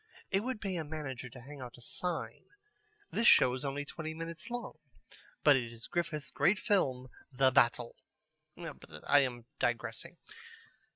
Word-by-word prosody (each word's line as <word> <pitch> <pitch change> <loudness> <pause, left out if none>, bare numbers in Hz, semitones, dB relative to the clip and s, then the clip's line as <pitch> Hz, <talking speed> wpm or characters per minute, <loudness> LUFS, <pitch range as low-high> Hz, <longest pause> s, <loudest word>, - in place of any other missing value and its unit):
It 195 - +4
would 250 +2 -3
pay 190 -3 -2
a 165 - -1
manager 145 -5 -5
to 125 +1 -11
hang 140 +2 -10
out 125 -1 -8
a - - -15
sign: 175 +7 -4 0.7
"This 230 +1 +3
show 125 - +7
is 130 +2 -4
only 145 +1 -2
twenty 160 +1 -5
minutes 165 +4 -6
long, 245 +1 -5 0.6
but 145 -2 +8
it 120 -3 -1
is 115 -1 -8
Griffith's 165 -4 -2
great 170 +8 +3
film 140 - +1 0.2
'The 130 0 +4
Battle.'" 120 -1 +3 0.6
But - - -9
I 145 - +7
am 120 -4 -1
digressing. 120 -2 -2
145 Hz, 160 wpm, -33 LUFS, 125-170 Hz, 0.7 s, but